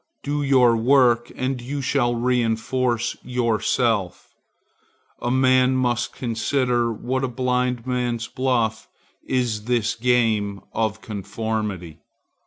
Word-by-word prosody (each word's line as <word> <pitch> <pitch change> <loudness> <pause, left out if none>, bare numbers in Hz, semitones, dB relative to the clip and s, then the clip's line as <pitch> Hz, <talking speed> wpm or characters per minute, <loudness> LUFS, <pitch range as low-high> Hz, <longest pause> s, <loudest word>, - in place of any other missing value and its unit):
Do 145 +1 -1
your 130 -4 +4
work, 120 0 +3
and 130 -1 -2
you 140 +4 -4
shall 130 -3 +1
reinforce 120 0 0
yourself. 115 -4 0 0.9
A 120 - -1
man 130 0 +3
must 120 -2 0
consider 120 0 0
what 130 +4 -3
a - - +1
blindman's 125 -1 -1
buff 120 -4 -1 0.4
is 120 -5 -1
this 120 -2 +1
game 110 -4 +1
of 110 -1 -1
conformity. 100 -4 -4
120 Hz, 100 wpm, -23 LUFS, 110-130 Hz, 0.9 s, your